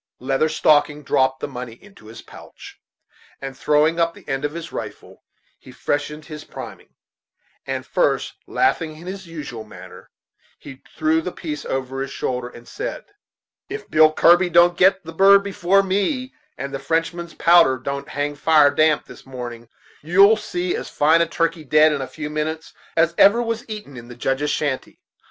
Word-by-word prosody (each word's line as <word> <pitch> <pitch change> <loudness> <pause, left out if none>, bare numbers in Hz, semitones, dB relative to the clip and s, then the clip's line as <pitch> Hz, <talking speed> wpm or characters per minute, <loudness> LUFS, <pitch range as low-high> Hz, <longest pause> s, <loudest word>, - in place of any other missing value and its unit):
Leather 135 +4 0
Stocking 150 -1 +2
dropped 130 -1 +1
the - - -3
money 125 -4 -7
into 195 - -18
his 115 - -11
pouch, - - -14 0.6
and 135 -1 -7
throwing 150 +4 +2
up 170 0 +1
the - - -17
end 135 +1 -3
of 145 0 -2
his 170 -1 -7
rifle - - -8 0.4
he - - -15
freshened 150 +1 -3
his 155 -1 -9
priming; - - -11 0.7
and - - -3
first - - 0
laughing 165 - 0
in 165 - -12
his 190 0 -7
usual 140 -9 -7
manner, 105 - -13 0.5
he 135 -1 -12 0.2
threw 160 +1 +2
the 180 - -5
piece 150 -5 -6
over 135 0 -3
his 135 - -4
shoulder, 125 -2 -3
and 120 -1 -15
said: - - -6 0.6
"If 420 +2 -7
Billy 155 0 +6
Kirby 175 +2 +5
don't 175 +1 +5
get 190 +2 +3
the 165 0 -9
bird 195 +3 +6
before 195 0 +2
me, 230 +8 -1 0.2
and 140 0 -6
the 135 - -3
Frenchman's 165 +2 -2
powder 170 -6 +5
don't 140 +2 -5
hang 145 +1 -2
fire 150 0 +4
this 155 -1 +1
damp - - -25
morning, 120 -3 -8 0.3
you'll 195 +7 +5
see 180 -4 -3
as - - -6
fine 160 +3 +3
a 170 - +2
turkey 165 0 -1
dead, 155 +2 +4
in 140 - -3
a 130 - -4
few 150 +1 -7
minutes, 155 +1 -4 0.2
as 165 0 +3
ever 205 +4 +6
was 230 0 -3
eaten 210 -10 -8
in 120 -1 -10
the 120 - -11
Judge's 135 +4 -1
shanty. 140 -4 -3
155 Hz, 175 wpm, -21 LUFS, 140-175 Hz, 0.7 s, Billy